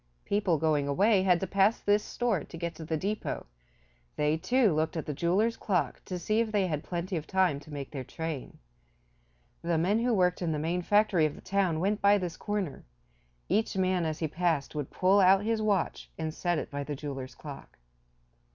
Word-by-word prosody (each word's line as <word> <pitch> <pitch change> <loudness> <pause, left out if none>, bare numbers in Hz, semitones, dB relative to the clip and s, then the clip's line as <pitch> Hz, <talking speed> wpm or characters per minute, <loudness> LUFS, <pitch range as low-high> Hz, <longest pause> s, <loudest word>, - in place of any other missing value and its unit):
People 200 -5 +1
going 150 -2 +1
away 195 +8 +3
had 180 -2 +3
to - - 0
pass 195 +4 +3
this 205 +1 +2
store 230 -9 -1
to 165 - -10
get 170 0 -3
to 160 - -9
the 160 0 -2
depot; 205 +6 -3 0.7
they 150 +1 +2
too 230 +4 +2
looked 160 +2 0
at 160 - -3
the 150 - -3
jeweler's 195 +10 +1
clock 185 -4 -1
to 180 - -4
see 215 +6 0
if 230 -1 0
they 205 -3 +2
had 155 -3 -2
plenty 175 +1 -3
of 155 - -6
time 185 -7 +2
to 150 - -14
make 140 -2 -6
their 135 -3 -5
train. 155 +1 -6 1.0
The 170 -1 0
men 190 +7 +2
who 240 0 +2
worked 180 -2 +2
in 165 -3 0
the - - -1
main 165 +4 -1
factory 205 -4 +3
of 150 - -7
the - - -12
town 190 -5 0
went 200 +4 0
by 200 +1 +6
this 180 -4 -4
corner; 205 -7 -3 0.6
each 210 +1 0
man 185 -1 +2
as 155 -1 -2
he 160 - -1
passed 160 -2 -1
would 150 -3 -4
pull 190 +2 +3
out 190 +1 +5
his 225 0 0
watch 205 -5 0
and 160 -1 -3
set 175 0 0
it - - -4
by 140 0 -3
the 145 +1 -4
jeweler's 135 -2 -6
clock. 145 -3 -10
175 Hz, 205 wpm, -29 LUFS, 155-200 Hz, 1.0 s, by